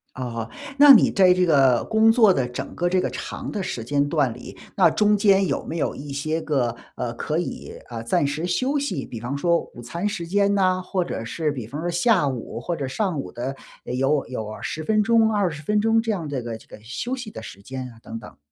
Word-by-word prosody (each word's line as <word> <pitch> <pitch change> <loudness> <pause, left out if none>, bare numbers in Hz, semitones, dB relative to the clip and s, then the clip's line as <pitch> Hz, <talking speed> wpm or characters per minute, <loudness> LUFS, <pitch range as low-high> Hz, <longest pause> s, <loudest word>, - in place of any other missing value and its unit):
哦。 115 -3 -4 0.3
那 285 -1 +10
你 235 - +6
在 185 -2 +5
这 180 0 +2
个 135 -6 +4
工 220 0 +4
作 220 -4 +6
的 130 -7 0
整 125 - -6
个 175 0 0
这 185 - +2
个 - - -1
长 - - -6
的 205 - -3
时 125 -11 -4
间 145 +4 +1
段 145 -7 +1
里， - - -11 0.2
那 - - +5
中 210 0 +3
间 195 -1 +4
有 - - -1
没 165 - -4
有 155 - -1
一 145 0 -8
些 155 +4 -2
个， 130 -7 0 0.2
呃， 120 -2 -3
可 150 +6 -2
以 175 - -5
啊， 115 -2 -6
暂 115 +5 +1
时 145 +4 -2
休 255 +10 0
息。 270 - -3
比 115 - -7
方 125 +5 -4
说 170 +2 +2
午 120 - -10
餐 170 - -3
时 180 -5 -3
间 200 +2 +2
呢， 185 -2 +2
或 185 -1 -1
者 115 - -4
是 150 +5 -1
比 125 -6 -6
方 145 +6 -6
说 175 - -2
下 175 -1 +3
午 125 -3 -4
或 170 +8 -3
者 140 -4 -3
上 180 +2 -1
午 - - -6
的， 130 +3 -4 0.3
有 135 +3 0
有 110 -3 -5
10 155 - -4
分 215 +5 +2
钟、 225 0 +3
20 180 -8 0
分 210 +7 +1
钟 225 +1 +3
这 225 - -1
样 175 -7 -3
这 135 -3 -2
个 115 -1 -5
这 - - -20
个 - - -12
休 235 - -4
息 245 -4 -7
的 - - -8
时 100 - -10
间 130 +4 -6
啊 115 - -17
等 115 - -7
等。 - - -13
155 Hz, 250 characters per minute, -23 LUFS, 125-200 Hz, 0.3 s, 那